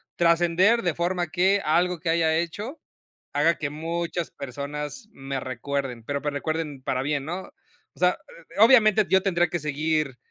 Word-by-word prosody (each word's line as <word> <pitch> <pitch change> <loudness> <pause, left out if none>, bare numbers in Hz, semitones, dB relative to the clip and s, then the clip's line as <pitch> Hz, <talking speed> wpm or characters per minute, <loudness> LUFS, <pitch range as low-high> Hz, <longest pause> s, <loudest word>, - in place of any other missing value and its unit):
trascender, 175 +6 +3
de 175 -3 0
forma 175 +1 -1
que, 190 +5 +2
algo 175 +2 +2
que 165 - -3
haya 165 -1 +2
hecho, 205 - -4 0.5
haga 170 +1 +3
que 145 -3 -3
muchas 165 +2 -3
personas, 145 - -6
me 135 0 -5
recuerden, 130 -1 -4
pero 140 +3 -3
me 150 - -1
recuerden, 150 -1 -3
para 130 -1 -1
bien, 140 0 -1
¿no? 175 +4 -4 0.5
O - - -18
sea, - - +3 0.4
obviamente, 215 -3 +6
yo 190 0 +4
tendría 175 -3 +2
que 175 +1 -2
seguir 150 -2 -1
165 Hz, 155 wpm, -25 LUFS, 145-180 Hz, 0.5 s, obviamente